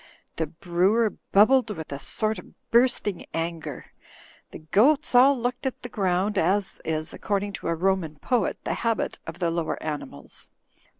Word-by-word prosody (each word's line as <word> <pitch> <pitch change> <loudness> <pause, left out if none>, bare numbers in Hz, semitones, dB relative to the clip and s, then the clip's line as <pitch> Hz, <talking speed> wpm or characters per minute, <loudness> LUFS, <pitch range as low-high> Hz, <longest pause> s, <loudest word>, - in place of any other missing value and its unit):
The 160 - 0
brewer 185 +7 +1 0.2
bubbled 235 +5 +5
with 160 -8 -6
a 140 - -4
sort 215 +3 0
of - - -15 0.2
bursting 235 -6 +2
anger. 165 -4 -4 0.6
The - - -9
goats 255 - +3
all 260 +2 +6
looked 245 +2 -2
at 260 - -5
the 245 - -6
ground 195 0 0
as 190 +4 0
is, 155 0 -2
according 200 0 -2
to - - -4
a 165 - +1
Roman 180 -3 0
poet, 230 - 0
the - - -1
habit 230 -2 -1
of 165 +1 -6
the 170 -2 0
lower 165 -1 -1
animals. 145 - -6
195 Hz, 160 wpm, -25 LUFS, 165-230 Hz, 0.6 s, all